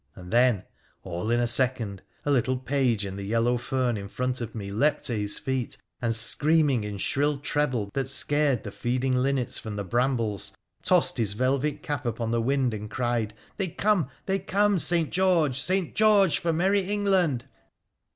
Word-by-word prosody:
And 90 +2 -10
then, 120 -5 +4 0.4
all 90 +3 -4
in 120 +1 +2
a 120 - +2
second, 120 -5 +1 0.2
a 145 - +1
little 130 -1 +2
page 125 -5 0
in 95 0 -6
the 100 - -5
yellow 115 +4 +1
fern 125 -2 -1
in 100 -1 -6
front 125 +4 -2
of 115 - -6
me 100 -3 -5
leapt 140 +9 +1
to 125 - -1
his 105 -1 0
feet, 130 -2 -3 0.2
and, 115 -2 0
screaming 145 +2 +2
in 105 -1 -5
shrill 145 +8 +1
treble 130 -7 -1
that 135 -1 -1
scared 140 -1 +2
the 100 - -6
feeding 125 +4 -1
linnets 130 -1 0
from 110 -2 -6
the 100 - -3
brambles, 115 -1 -1 0.3
tossed - - +2
his 105 -4 +2
velvet 135 +6 0
cap 145 -3 -3
upon 115 0 -2
the 115 0 +1
wind 130 0 +1
and 105 0 -6
cried 120 -3 -1
— - - -26
' - - -34
They 195 - -1
come! 185 - +1 0.2
they 195 0 0
come, 200 +1 +2
St. 170 -2 +1
George! 165 -8 +2
St. 185 0 0
George 210 -5 +4
for 170 -2 0
merry 190 +5 +2
England 190 -11 +1
130 Hz, 185 wpm, -26 LUFS, 115-150 Hz, 0.4 s, then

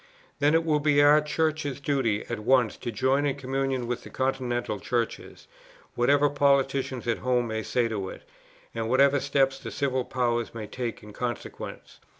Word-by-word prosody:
then 145 +2 +3
it 165 0 +2
will 155 -2 +2
be 145 -1 +3
our 145 +1 +6
Church's 150 -2 -1
duty 135 -7 0
at 115 -2 -4
once 120 0 +3
to 120 - -5
join 130 +6 +1
in 140 -2 0
communion 135 -2 -2
with 120 0 -3
the - - -11
continental 125 -5 -2
Churches, 115 +4 -3 0.5
whatever 140 +4 +3
politicians 140 -3 +1
at 115 - 0
home 125 -1 +1
may 110 -1 -3
say 120 +2 0
to 100 -4 -3
it, - - -10 0.5
and 115 -1 -3
whatever 140 +2 +4
steps 135 -1 +1
the - - -7
civil 130 -2 -1
power 120 -2 0
may 110 -2 -5
take 120 0 -5
in 105 0 -11
consequence. 120 +1 -6
130 Hz, 170 wpm, -27 LUFS, 120-140 Hz, 0.5 s, our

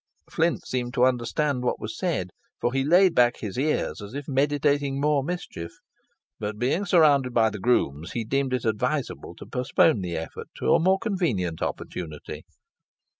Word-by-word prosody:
Flint 165 +1 0
seemed 125 0 -3
to 125 -1 +5
understand 130 +2 0
what 125 - -1
was 110 +1 -6
said, 150 - -2 0.3
for 120 - 0
he 135 0 +1
laid 175 +5 +5
back 120 0 +4
his 105 -4 -6
ears 140 -3 -1
as 105 +5 -9
if 145 0 -5
meditating 145 0 +1
more 145 0 +2
mischief; 165 - -5 0.7
but 105 0 -4
being 140 - 0
surrounded 145 -8 +4
by 110 -2 +4
the 105 - -6
grooms, 85 - 0
he 115 -2 -2
deemed 135 +3 0
it 125 -2 -1
advisable 110 -2 -2
to - - -11
postpone 125 -1 +2
the 90 -2 -3
attempt 80 0 -7
to - - +2
a - - +5
more 190 +4 +3
convenient 155 - -1
opportunity. 80 -4 -5
130 Hz, 170 wpm, -25 LUFS, 110-150 Hz, 0.7 s, to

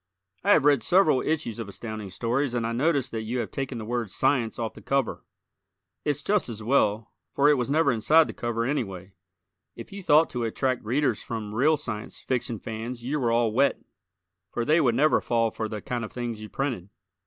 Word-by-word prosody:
I 205 +2 +5
have 150 - +3
read 145 -4 +5
several 170 - +4
issues 150 -8 -2
of 110 -3 -5
Astounding 105 0 -6
Stories 120 +7 -1
and 115 -2 0
I 115 - -1
notice 140 +2 +1
that 110 - -3
you 115 +3 -3
have 120 -3 -3
taken 135 -2 -4
the 110 - -6
word 120 -2 -2
"science" 125 0 +1
off 115 -2 -3
the - - -13
cover. 135 -3 -1 0.8
It's 145 -1 -1
just 205 -6 +1
as 110 -1 -6
well, 110 -3 +1 0.2
for 145 +1 +5
it - - +6
was 125 -2 -1
never 150 -1 +3
inside 150 +8 +4
the - - -7
cover, 115 -1 -2
anyway. 100 -9 -3 0.6
If 115 - -10
you 200 0 -7
thought 160 -2 +4
to 120 -1 -2
attract 130 +3 -1
Readers 120 0 0
from 110 -3 -5
real 150 +7 +3
Science 115 -7 -5
Fiction 125 -2 -2
fans 115 +3 -6
you 145 +5 -1
were 120 -3 +1
all 115 -1 +2
wet, 135 +5 +2 0.7
for 120 - -2
they 160 +5 +4
would 120 -3 +2
never 150 +5 +3
fall 115 -1 +1
for 110 0 -4
the 105 -2 -6
kind 120 -1 -3
of 110 - -6
things 120 -3 -4
you 110 - -8
printed. 120 -9 -3
120 Hz, 210 wpm, -26 LUFS, 110-140 Hz, 0.8 s, it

